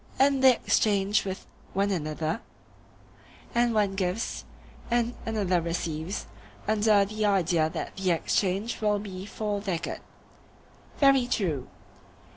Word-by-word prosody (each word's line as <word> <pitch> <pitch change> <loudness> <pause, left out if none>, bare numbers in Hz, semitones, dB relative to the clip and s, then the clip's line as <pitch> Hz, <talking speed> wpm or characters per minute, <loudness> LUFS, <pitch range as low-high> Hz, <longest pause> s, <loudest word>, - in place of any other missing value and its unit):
And 270 0 +3
they 260 -1 +9
exchange 205 -1 +2
with 190 -1 -5 0.3
one 200 +1 +1
another, 160 +3 -2 1.1
and 240 0 +3
one 210 -3 +2
gives, 195 +3 -2 0.4
and 240 0 +1
another 195 -6 +1
receives, 165 +1 -3 0.4
under 210 -1 +4
the 215 +2 -3
idea 175 -5 +2
that - - -6
the 190 -1 0
exchange 195 +6 0
will 210 -1 +2
be 195 -1 -7
for 205 -1 -3
their 190 -4 -1
good. - - -5 1.0
Very 275 -3 +5
true. 165 - -1
200 Hz, 120 wpm, -27 LUFS, 180-220 Hz, 1.1 s, they